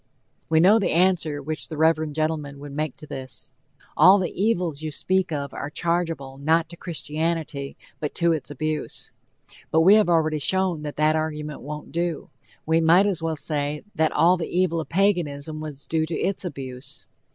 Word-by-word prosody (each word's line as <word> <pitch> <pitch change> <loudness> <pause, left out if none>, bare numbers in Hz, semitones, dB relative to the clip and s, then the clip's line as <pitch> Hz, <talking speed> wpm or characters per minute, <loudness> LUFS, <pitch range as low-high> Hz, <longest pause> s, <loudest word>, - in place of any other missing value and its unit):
We 160 0 +4
know 200 +7 +6
the 200 - 0
answer 165 -5 +2
which 155 +2 -3
the 155 - -7
reverend 155 -1 +2
gentleman 155 -3 -2
would 145 0 -9
make 150 -1 -3
to - - -11
this: 130 -3 -5 0.4
"All 185 +6 +7
the 185 -4 -1
evils 180 -7 0
you 155 - -3
speak 185 +4 0
of 140 -2 -3
are 140 - -5
chargeable, 165 -5 -2
not 160 +3 +2
to 170 - -8
Christianity, 160 -4 -3 0.2
but 150 - -4
to 170 -1 +2
its 155 -5 -2
abuse." 155 +2 -3 0.6
But 160 - +3
we 190 +5 +7
have 215 -4 +5
already 155 -2 +2
shown 185 +2 +2
that 150 -1 -5
that 155 +1 +3
argument 150 -1 -3
won't 150 +2 -7
do. 170 -1 -2 0.3
We 160 +1 +3
might 170 +5 +5
as 195 -5 0
well 165 -1 -1
say 150 -1 -2
that 160 0 +2
all 175 +2 +4
the 165 - -3
evil 175 -2 +1
of 155 - -5
Paganism 165 -6 0
was 150 -3 -8
due 160 -1 0
to 165 - -2
its 195 - -1
abuse. 130 -7 -6
160 Hz, 185 wpm, -24 LUFS, 150-170 Hz, 0.6 s, All